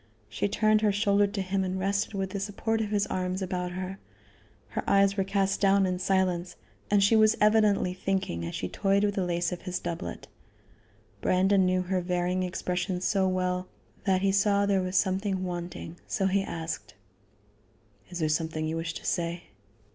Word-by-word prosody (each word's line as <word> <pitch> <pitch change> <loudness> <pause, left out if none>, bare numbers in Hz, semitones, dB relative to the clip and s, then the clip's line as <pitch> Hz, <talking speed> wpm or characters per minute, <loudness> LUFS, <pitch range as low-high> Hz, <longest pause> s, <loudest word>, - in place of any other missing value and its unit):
She - - -1
turned 215 +1 +3
her 210 -1 +3
shoulder 205 0 +3
to 200 0 -3
him 190 +1 -1
and 185 0 -2
rested 200 +2 -1
with 190 -1 -2
the 200 - -3
support 220 +3 -1
of 215 - -2
his 205 -1 +1
arms 185 0 -2
about 180 -1 -3
her. 185 +1 -5 0.7
Her - - -3
eyes 195 0 +4
were 195 - +1
cast 195 0 0
down 195 -1 +4
in 180 -1 -1
silence, 180 -2 0 0.3
and 205 -1 +4
she 205 +3 +4
was 215 0 +5
evidently 210 -3 +3
thinking 185 - -2
as 85 - -4
she 90 - -3
toyed 200 - +1
with 205 -1 +2
the 195 - -1
lace 175 0 -1
of 180 - -5
his 180 -1 -3
doublet. 165 - -5 0.9
Brandon 190 +1 +3
knew 185 0 +1
her 185 0 -1
varying 180 +1 0
expressions 180 0 -2
so 195 -2 +2
well 185 0 -1 0.4
that 190 -1 +2
he 195 - +3
saw 200 +1 +3
there 200 -1 +2
was 185 +1 -1
something 190 0 0
wanting, 175 -1 -6
so 195 - -1
he 195 +1 +2
asked: 160 - -5 1.1
"Is 175 - -6
there 160 -2 0
something 155 0 -1
you 160 +1 -2
wish 165 0 -3
to - - -8
say?" 170 0 -1
190 Hz, 185 wpm, -28 LUFS, 180-200 Hz, 1.1 s, was